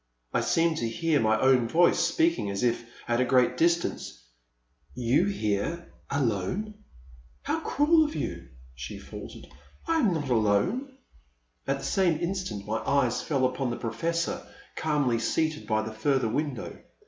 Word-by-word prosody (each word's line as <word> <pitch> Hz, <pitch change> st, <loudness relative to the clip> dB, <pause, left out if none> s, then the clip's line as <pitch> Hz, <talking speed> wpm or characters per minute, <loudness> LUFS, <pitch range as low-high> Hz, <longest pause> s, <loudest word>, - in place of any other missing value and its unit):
I -, -, +2 dB
seemed 165 Hz, -1 st, +2 dB
to 115 Hz, -, -1 dB
hear 160 Hz, +5 st, +1 dB
my 110 Hz, 0 st, +2 dB
own 130 Hz, -3 st, +4 dB
voice 170 Hz, +8 st, +4 dB
speaking 325 Hz, -, +1 dB
as 100 Hz, +3 st, -3 dB
if 120 Hz, -1 st, 0 dB, 0.2 s
at 120 Hz, 0 st, +1 dB
a -, -, +5 dB
great 125 Hz, -1 st, +3 dB
distance; 170 Hz, -, 0 dB, 0.7 s
you 125 Hz, +8 st, +2 dB
here 165 Hz, -, -2 dB
— -, -, -34 dB
alone? 125 Hz, -, -1 dB, 0.7 s
How -, -, -1 dB
cruel 315 Hz, +3 st, +3 dB
of 305 Hz, 0 st, -3 dB
you,*' 85 Hz, -1 st, -4 dB, 0.3 s
she 65 Hz, +2 st, -7 dB
faltered, -, -, -10 dB, 0.4 s
I 330 Hz, 0 st, +2 dB
am 225 Hz, -10 st, +3 dB
not 150 Hz, -5 st, -2 dB
alone.'* 125 Hz, -, +1 dB, 0.7 s
At 135 Hz, 0 st, +1 dB
the -, -, -7 dB
same 175 Hz, -5 st, +2 dB
instant 170 Hz, -, -3 dB
my 110 Hz, +1 st, -1 dB
eyes 130 Hz, -1 st, +1 dB
fell 135 Hz, -4 st, 0 dB
upon 130 Hz, 0 st, -1 dB
the 120 Hz, -, -3 dB
Professor, 165 Hz, +9 st, -2 dB, 0.3 s
calmly 145 Hz, -7 st, +1 dB
seated 155 Hz, +6 st, -1 dB
by 110 Hz, -1 st, +1 dB
the 110 Hz, 0 st, -6 dB
further 130 Hz, +3 st, +1 dB
win 145 Hz, +3 st, -1 dB
dow. -, -, -6 dB
135 Hz, 160 wpm, -27 LUFS, 115-170 Hz, 0.7 s, a